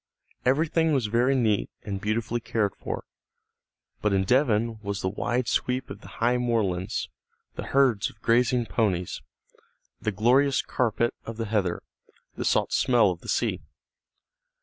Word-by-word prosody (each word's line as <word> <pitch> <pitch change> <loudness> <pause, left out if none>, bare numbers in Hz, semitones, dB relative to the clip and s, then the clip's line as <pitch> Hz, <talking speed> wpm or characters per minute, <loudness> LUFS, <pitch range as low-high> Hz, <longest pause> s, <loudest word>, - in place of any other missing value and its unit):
Everything 160 +4 +2
was 130 -5 +1
very 120 +5 +2
neat 110 -5 +1
and 100 -2 -4
beautifully 110 +2 -1
cared 110 -3 -1
for. - - -5 1.0
But 105 -1 +1
in 95 0 +2
Devon 115 -2 +2
was 100 -2 -3
the - - -1
wide 115 +5 -1
sweep 125 +1 -1
of 100 +1 -8
the - - -12
high 120 +2 +2
moorlands, 110 -5 -1 0.5
the - - -6
herds 130 -7 +3
of 110 - -19
grazing 120 +1 +2
ponies, 95 -4 -1 0.8
the 110 - 0
glorious 125 +7 +3
carpet 120 -1 0
of 115 -1 -7
the 115 - -2
heather, 100 -5 -1 0.5
the - - -3
salt - - +1
smell 120 -6 +4
of 85 - -7
the - - -10
sea. - - 0
115 Hz, 150 wpm, -26 LUFS, 105-125 Hz, 1.0 s, smell